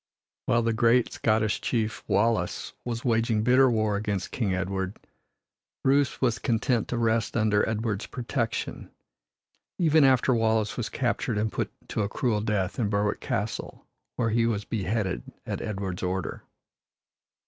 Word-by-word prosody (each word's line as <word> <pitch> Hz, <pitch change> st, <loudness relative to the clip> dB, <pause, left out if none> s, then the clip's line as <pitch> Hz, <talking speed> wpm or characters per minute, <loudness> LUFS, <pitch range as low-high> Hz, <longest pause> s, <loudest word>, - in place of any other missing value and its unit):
While 115 Hz, 0 st, +3 dB
the 115 Hz, 0 st, +1 dB
great 115 Hz, +2 st, +3 dB
Scottish 110 Hz, -1 st, +1 dB
chief, 110 Hz, -2 st, -1 dB
Wallace, 105 Hz, -4 st, +1 dB
was 120 Hz, 0 st, -4 dB
waging 115 Hz, -2 st, +2 dB
bitter 130 Hz, +2 st, +5 dB
war 110 Hz, -3 st, +1 dB
against 100 Hz, -2 st, -2 dB
King 110 Hz, -6 st, -1 dB
Edward, 95 Hz, +1 st, -2 dB, 0.9 s
Bruce 140 Hz, 0 st, +2 dB
was 120 Hz, -3 st, +1 dB
content 120 Hz, 0 st, +1 dB
to 120 Hz, -, -2 dB
rest 115 Hz, 0 st, +1 dB
under 110 Hz, -2 st, +2 dB
Edward's 110 Hz, -1 st, -2 dB
protection, 120 Hz, -1 st, -3 dB, 0.9 s
even 160 Hz, -3 st, +4 dB
after 130 Hz, -1 st, +4 dB
Wallace 110 Hz, -2 st, +1 dB
was 120 Hz, -, -3 dB
captured 120 Hz, -3 st, -1 dB
and 110 Hz, +1 st, 0 dB
put -, -, -2 dB, 0.2 s
to -, -, -1 dB
a 100 Hz, -, -1 dB
cruel 110 Hz, -2 st, 0 dB
death 105 Hz, -1 st, -1 dB
in 110 Hz, -4 st, +1 dB
Berwick 105 Hz, 0 st, 0 dB
castle, -, -, -4 dB, 0.3 s
where 115 Hz, -2 st, 0 dB
he 115 Hz, +1 st, +3 dB
was 105 Hz, -3 st, -1 dB
beheaded 100 Hz, -, -1 dB, 0.2 s
at -, -, -4 dB
Edward's 95 Hz, -3 st, -4 dB
order. 95 Hz, -1 st, -3 dB
110 Hz, 145 wpm, -27 LUFS, 105-120 Hz, 0.9 s, bitter